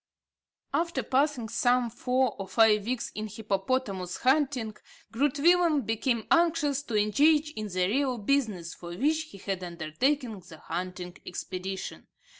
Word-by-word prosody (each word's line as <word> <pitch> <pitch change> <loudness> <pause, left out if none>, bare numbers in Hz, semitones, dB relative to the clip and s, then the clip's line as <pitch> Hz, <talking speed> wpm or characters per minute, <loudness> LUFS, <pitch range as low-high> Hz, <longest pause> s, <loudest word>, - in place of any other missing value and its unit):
After 320 -3 0
passing 265 -1 +1
some 245 +1 +2
four 250 +1 0
or 195 - -4
five 215 -1 +4
weeks 250 -1 -2
in 215 0 -4
hippopotamus 200 -2 -2
hunting, 260 -5 +1 0.4
Groot 275 +4 +1
Willem 335 -2 +4
became 225 +1 0
anxious 330 -5 +3
to 235 -7 -2
engage 295 +9 +3
in 215 -7 -5
the 185 -2 0
real 255 +5 +1
business 210 -8 0
for 175 0 -8
which 310 +6 +1
he - - -12
had 190 -1 -4
undertaken 195 - -1
the 170 -3 -13
hunting 180 +2 -5
expedition. 185 +1 -6
230 Hz, 135 wpm, -28 LUFS, 195-280 Hz, 0.4 s, five